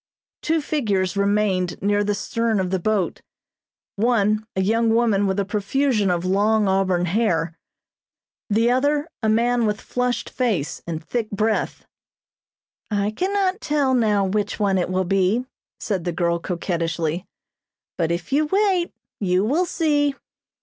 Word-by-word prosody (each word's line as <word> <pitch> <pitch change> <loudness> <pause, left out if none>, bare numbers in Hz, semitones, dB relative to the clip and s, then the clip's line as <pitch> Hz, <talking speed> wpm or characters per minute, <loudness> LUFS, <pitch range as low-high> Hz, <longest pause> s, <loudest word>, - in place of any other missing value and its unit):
Two 325 0 +1
figures 205 -12 0
remained 200 -3 +1
near 205 +1 +1
the 205 0 0
stern 225 +1 -1
of 185 -1 -1
the 190 - +1
boat. 205 -1 -1 0.8
One, 215 -1 +2
a 190 - +1
young 225 +3 +2
woman 215 -4 +2
with 190 +1 0
a 200 - 0
profusion 210 +2 0
of 175 0 0
long 205 +3 +2
auburn 190 -2 +1
hair, 175 -4 0 0.9
the 225 +3 +3
other 290 +4 +1
a 220 - +1
man 235 +1 +2
with 210 0 -1
flushed 250 -1 -2
face 210 - -1
and 160 -1 -4
thick 225 +5 -2
breath. 215 +2 -1 1.0
"I 205 -1 0
cannot 380 - 0
tell 290 -3 +1
now 210 -5 +2
which 205 +2 -1
one 195 -2 +2
it 180 - -1
will 185 0 0
be," 195 +6 +1 0.3
said 195 -5 -2
the 175 - -1
girl 170 0 0
coquettishly, 170 -1 -2 0.7
"but 165 -2 0
if 175 +9 -3
you 300 +2 +3
wait 380 -1 +1 0.3
you 185 0 +1
will 325 +10 +1
see." 290 -4 +1
210 Hz, 145 wpm, -22 LUFS, 185-245 Hz, 1.0 s, the